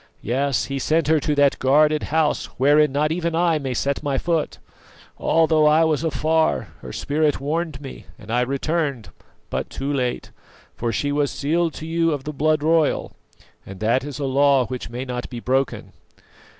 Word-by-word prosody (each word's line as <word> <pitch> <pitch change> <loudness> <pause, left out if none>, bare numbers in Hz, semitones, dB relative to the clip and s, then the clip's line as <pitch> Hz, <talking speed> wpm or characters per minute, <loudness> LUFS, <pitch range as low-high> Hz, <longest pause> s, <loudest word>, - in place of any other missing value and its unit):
Yes, 135 +3 0
he 140 0 -4
sent 155 +3 +1
her 160 -1 +4
to 150 +1 -1
that 145 -1 +3
guarded 150 +3 +3
house 155 -1 +1
wherein 145 +2 +4
not 150 +2 0
even 170 0 -1
I 165 -2 +2
may 135 -3 -3
set 140 +3 -1
my 140 -2 -1
foot. 165 +1 -1 0.6
Although 160 -2 +3
I 155 +2 +5
was 160 -1 +1
afar, 160 +1 +1
her 65 - -8
spirit 150 - 0
warned 155 +1 -2
me, 135 -2 -10
and 115 -3 -10
I 120 +1 +2
returned, 140 -1 -2 0.4
but - - -3
too 140 +2 -3
late; 125 -3 -2 0.4
for 120 -1 -2
she 145 +6 -1
was 145 -1 +1
sealed 165 +3 -1
to 155 - -7
you 165 0 +1
of 140 -2 -4
the 150 - -5
blood 155 +1 +1
royal, 160 -1 +2 0.5
and 95 -1 -10
that 115 +4 +2
is 145 -1 -6
a 145 - -3
law 135 -1 +3
which 125 -1 -6
may 125 +2 -5
not 125 -1 -5
be 120 - -6
broken. 130 +2 -1
145 Hz, 180 wpm, -22 LUFS, 130-155 Hz, 0.6 s, I